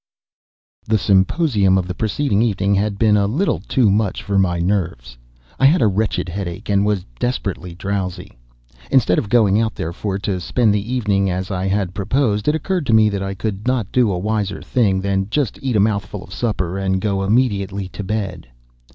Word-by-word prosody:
The 110 0 +3
symposium 100 - +2
of 90 -1 -1
the 90 - -3
preceding 110 +2 0
evening 100 -4 +1
had 100 +1 0
been 105 0 +3
a 100 -1 +2
little 155 - 0
too 120 -7 +2
much 105 -1 0
for 100 -1 0
my 90 -2 +1
nerves. 85 -10 -2 0.4
I 135 - +4
had 165 +6 +4
a 120 - +3
wretched 100 -1 0
headache, 90 0 -5
and 100 -1 +3
was 100 -4 0
desperately 100 -8 -3
drowsy. 95 -1 -4 0.6
Instead 110 -9 +3
of 105 - -5
going 110 -3 +4
out 110 -1 -1
therefore 95 +4 -3
to 100 -2 -2
spend 110 +4 +1
the 105 +3 -2
evening 100 -6 +1
as 95 +2 -3
I 95 0 -2
had 95 -2 -1
proposed, 105 +1 0
it 150 - +3
occurred 170 -1 -2
to 115 - +4
me 110 -1 +5
that 100 -2 -3
I 95 0 -3
could 105 +2 -4
not 125 -6 0
do 120 -5 +3
a 90 - -1
wiser 100 0 -2
thing 100 -6 +1
than 95 0 -1
just 135 -1 -1
eat 130 -4 -1
a - - +4
mouthful 100 -1 -1
of 95 - -12
supper 95 -5 -2
and 95 -1 0
go 100 -1 -1
immediately 100 -3 0
to 100 - -7
bed. 95 - -4
100 Hz, 195 wpm, -19 LUFS, 95-110 Hz, 0.6 s, me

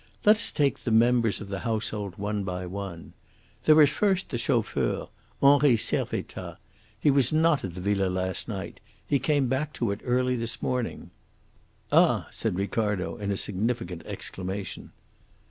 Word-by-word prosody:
Let 210 +1 +7
us 230 - +1
take 140 -2 +1
the - - -4
members 115 -2 +3
of 100 - -8
the 100 -1 -3
household 110 -4 -3
one 105 0 -2
by 90 -1 -4
one. 90 -2 -7 0.5
There 155 0 +7
is 145 - +4
first 195 +1 +1
the 120 - -3
chauffeur, 115 -3 0 0.3
Henri 140 -3 +6
Servettaz. - - -2 0.4
He 145 - +4
was 135 -3 +4
not 160 -1 +3
at 90 -3 -5
the 90 - -6
villa 100 0 +1
last 95 0 -1
night. - - -6 0.3
He 140 - +2
came 145 +1 +1
back 140 +4 -1
to 115 -4 -1
it 100 - -5
early 125 0 +1
this 115 -1 -2
morning." 125 -2 -3 0.8
"Ah!" - - +4
said 90 - -2
Ricardo, 100 -1 -1
in 100 -1 -4
a 100 - 0
significant 100 -4 -1
exclamation. 95 +1 -6
115 Hz, 160 wpm, -27 LUFS, 100-135 Hz, 0.8 s, Let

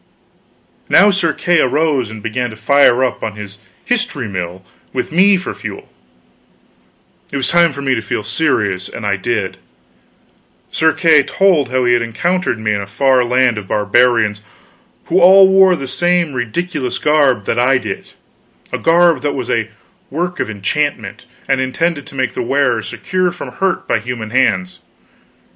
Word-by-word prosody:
Now 205 +1 +6
Sir 175 -4 0
Kay 175 +2 +1
arose 140 -3 0
and 110 -1 -10
began 125 +2 -2
to 110 - -10
fire 130 +1 +3
up 130 - -2
on 110 -2 -4
his 105 -1 -10 0.3
history 240 - -2
mill 95 -1 -6 0.3
with - - -3
me 190 +4 +4
for 185 - -5
fuel. - - -9 1.4
It 140 - -3
was 135 - -1
time 170 -1 +4
for 140 +1 -7
me 135 -1 +1
to 115 - -1
feel 105 0 -4
serious, 105 - -1
and 115 - -8
I 100 -1 +1
did. 100 0 -3 1.1
Sir 160 0 +2
Kay 160 -4 +4
told 165 -3 +1
how 130 -1 0
he 120 - +3
had 120 - +2
encountered 175 +8 -1
me 110 -1 -1
in 100 - -2
a 100 - -7
far 130 +4 +2
land 125 -2 +1
of 100 - -11
barbarians, 105 0 +1 0.6
who 180 +3 +1
all 190 +2 +8
wore 190 -1 +5
the 140 - -6
same 175 +2 0
ridiculous 130 +3 -3
garb 140 -8 +2
that 115 - -1
I 130 +2 +3
did 120 -4 -7 0.6
a - - -2
garb 170 0 +3
that 145 -1 -2
was 130 -3 -4
a 115 -2 -1 0.4
work 175 +4 -3
of - - -2
enchantment, 145 +8 -3 0.2
and 135 -1 +1
intended 145 +3 -2
to - - -13
make 130 -6 -1
the - - -3
wearer 125 -3 0
secure 185 - -2
from 175 - -8
hurt 190 0 -2
by - - +1
human 120 -3 -6
hands. 110 -8 0
130 Hz, 170 wpm, -16 LUFS, 110-165 Hz, 1.4 s, all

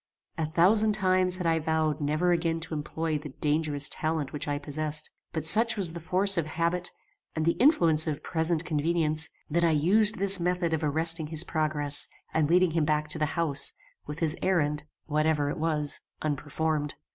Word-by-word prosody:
A 160 - 0
thousand 210 +7 +4
times 185 -2 +2
had 180 - -5
I 165 -1 +2
vowed 155 -1 -1
never 155 +5 +1
again 165 -1 0
to 165 - -7
employ 155 +1 -3
the 150 -2 -10
dangerous 150 -1 0
talent 155 -3 -3
which 150 - -4
I 145 0 -1
possessed; 155 +1 -2 0.2
but 160 - -3
such 225 +7 +4
was 180 -5 +1
the 170 - -6
force 185 +3 +3
of 155 - -2
habit 170 +2 -1 0.5
and 155 -1 -1
the 170 - +4
influence 170 - +4
of 150 -2 -3
present 165 0 -1
convenience, 155 0 -1 0.2
that 170 +2 +1
I 170 - +4
used 195 +8 +3
this 195 0 +2
method 175 -1 -1
of 160 0 -1
arresting 160 +2 +1
his 160 +1 -1
progress 150 -3 0 0.3
and 155 -2 +1
leading 180 0 +3
him 165 -1 0
back 150 0 0
to 155 - -1
the 150 - +1
house, 155 -5 +1 0.3
with 150 +3 -7
his 160 -1 +1
errand, 150 -5 0 0.2
whatever 150 -1 0
it - - -6
was, 155 -2 -1 0.2
unperformed. 150 0 -2
160 Hz, 180 wpm, -27 LUFS, 150-170 Hz, 0.5 s, thousand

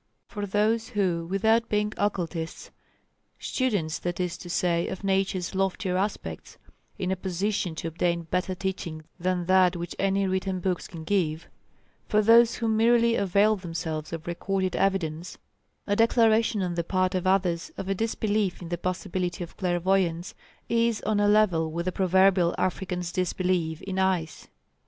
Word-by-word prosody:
For 205 -2 -5
those 220 +3 +1
who, 175 -5 0
without 220 +4 +2
being 210 0 0
occultists 175 -5 -3 0.7
students 205 - -1
that 175 0 -3
is 180 -1 -1
to 175 - -9
say 170 -1 +1
of 190 - -6
Nature's 190 -2 0
loftier 190 -1 -1
aspects, 185 - -3 0.4
in 185 0 -2
a - - +1
position 190 -1 -2
to 165 - -4
obtain 170 +1 -1
better 180 +3 -2
teaching 175 -4 -4 0.2
than 180 0 -1
that 185 0 +4
which 175 0 -5
any 195 0 +1
written 190 0 -1
books 180 -1 -2
can 165 -2 -9
give 165 -3 -1 0.6
for 215 0 +3
those 230 +2 +6
who 230 - -2
merely 230 +1 +4
avail 200 +1 +3
themselves 165 -4 -5
of 165 -1 -6
recorded 185 +2 -2
evidence, 175 -3 -1 0.5
a 205 - +1
declaration 225 -1 +3
on 180 -1 -2
the 170 0 -1
part 185 +2 0
of 185 0 -1
others 180 -3 +1
of 190 - -5
a 195 - +1
disbelief 210 -2 -1
in 175 - -8
the 175 -1 -3
possibility 180 0 -2
of 170 - -10
clairvoyance, 180 -1 0 0.3
is 230 -1 +1
on 215 -1 +1
a 205 - +3
level 190 -7 +3
with 170 +2 -3
the 185 - 0
proverbial 185 -1 +3
African's 180 -1 -2
disbelief 180 -3 -1
in 190 -1 -3
ice. 185 -4 -1
185 Hz, 155 wpm, -26 LUFS, 175-205 Hz, 0.7 s, those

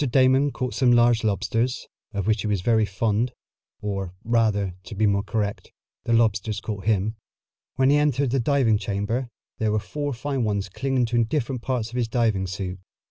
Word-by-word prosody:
Damon 130 +2 +4
caught 130 -2 -3
some 130 -3 +3
large 120 -1 +4
lobsters, 115 +4 0 0.2
of 100 -3 -3
which 110 -1 +2
he - - -2
was 100 -3 0
very 110 +1 +3
fond, 110 +5 0 0.5
or, 95 -3 -3
rather, 110 -5 +1
to - - -8
be 110 +2 +2
more 100 -1 +2
correct, 105 -1 -3 0.3
the 115 - +1
lobsters 110 -2 +2
caught 105 -3 -5
him. 110 0 +1 0.6
When 135 +1 +3
he 145 - +5
entered 140 -3 +1
the 135 - +2
diving 120 -4 +2
chamber 105 +5 -2 0.3
there 110 -1 +1
were 105 - +1
four 145 +9 -3
fine 135 +1 -2
ones 100 -3 -1
clinging 130 +5 0
to 120 0 +2
different 125 0 -2
parts 120 -3 -2
of 125 - -5
his 120 -2 +1
diving 110 -5 +1
suit. 95 0 -5
115 Hz, 185 wpm, -24 LUFS, 105-125 Hz, 0.6 s, he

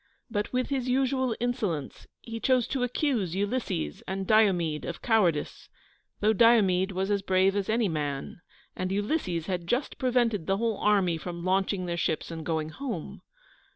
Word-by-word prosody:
But 210 -2 -2
with 255 0 -1
his 260 -3 -1
usual 260 -2 +1
insolence 215 - -2
he 230 -1 -6
chose 255 -1 +2
to 265 - -1
accuse 245 - 0
Ulysses 200 - -2
and 190 0 -3
Diomede 185 -8 +3
of 170 - -6
cowardice, 190 -10 +1 0.5
though 215 +1 +4
Diomede 200 -5 +4
was 190 +2 -1
as 200 -1 +1
brave 190 0 +2
as 200 0 -1
any 225 0 +2
man, 150 -1 -3 0.3
and 185 0 -3
Ulysses 195 - -1
had 175 -2 -3
just 250 +7 -1
prevented 240 - +1
the 195 0 +2
whole 225 -1 0
army 195 -5 +2
from 170 +1 -6
launching 190 0 +1
their 170 -1 -2
ships 160 0 -1
and 165 -1 -6
going 160 -1 -1
home. 225 - -6
195 Hz, 160 wpm, -28 LUFS, 175-235 Hz, 0.5 s, though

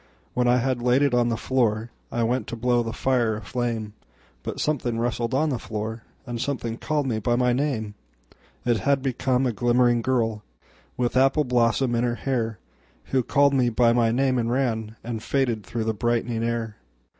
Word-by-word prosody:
When 125 0 +1
I 120 +1 +5
had 125 0 0
laid 125 +3 +3
it 140 -3 +2
on 120 -1 +3
the 115 - 0
floorI 115 -2 0 0.4
went 125 +2 -1
to - - -4
blow 120 +1 +2
the 115 -1 -3
fire 120 -2 +1
a 105 - -6
flame, 115 -4 -3 0.5
But - - -5
something 125 -6 -1
rustled 120 +1 -1
on 155 +3 +2
the 130 -5 -1
floor, 110 +1 -5 0.2
And 120 -1 -4
someone 120 -4 -2
called 150 +1 -1
me 115 -4 -1
by 120 +3 +1
my 125 0 +2
name:It 110 - -4
had 140 +6 +1
become 130 0 +1
a 125 - 0
glimmering 120 +2 +3
girlWith 115 - -3
apple 135 +3 +4
blossom 120 0 +2
in 120 0 +1
her 120 -1 0 1.0
hairWho 130 -3 +2
called 140 -1 +4
me 125 -3 +3
by 115 0 +3
my 120 -1 +3
name 130 +2 +2
and 115 -1 0
ranAnd 115 -2 -2
faded 120 -5 0
through 115 +4 -3
the 110 0 0
brightening 115 +1 -1
air. 115 -2 -2
120 Hz, 175 wpm, -25 LUFS, 115-130 Hz, 1.0 s, I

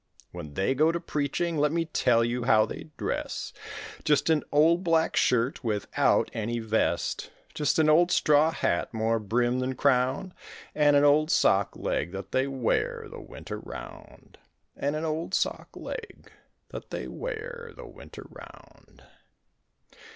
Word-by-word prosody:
When 75 -1 -9
they 95 +7 +1
go 155 +4 +3
to 170 - -2
preaching 155 +2 -2
let 150 0 +2
me 165 0 0
tell 120 -7 +2
you 120 +1 -2
how 110 -3 +5
they - - -8
dress; - - -3 0.5
Just 150 +2 +2
an 155 -2 +2
old 165 +5 +4
black 165 -2 +2
shirt 125 +3 +1
without 105 -3 +1
any 115 +1 -2
vest, 110 -1 -1 0.2
Just 150 - 0
an 160 -1 +4
old 170 +3 +5
straw 150 -2 +4
hat 85 - -1
more 110 +1 +1
brim 120 +4 0
than 130 +1 -2
crown 130 +6 +1 0.4
And 145 -1 +4
an 145 - +5
old 150 +2 +4
sock 100 - +3
leg 85 +5 -2
that 95 0 -7
they 130 +1 +1
wear 130 -4 -1
the - - -9
winter - - -8
round, - - -11 0.4
And 145 +2 -2
an 155 +1 -2
old 160 +4 -2
sock - - -1
leg 460 -2 -8 0.4
that - - -9
they - - -5
wear 475 0 -6
the - - -10
winter - - -12
round. - - -16
145 Hz, 150 wpm, -27 LUFS, 120-160 Hz, 0.5 s, how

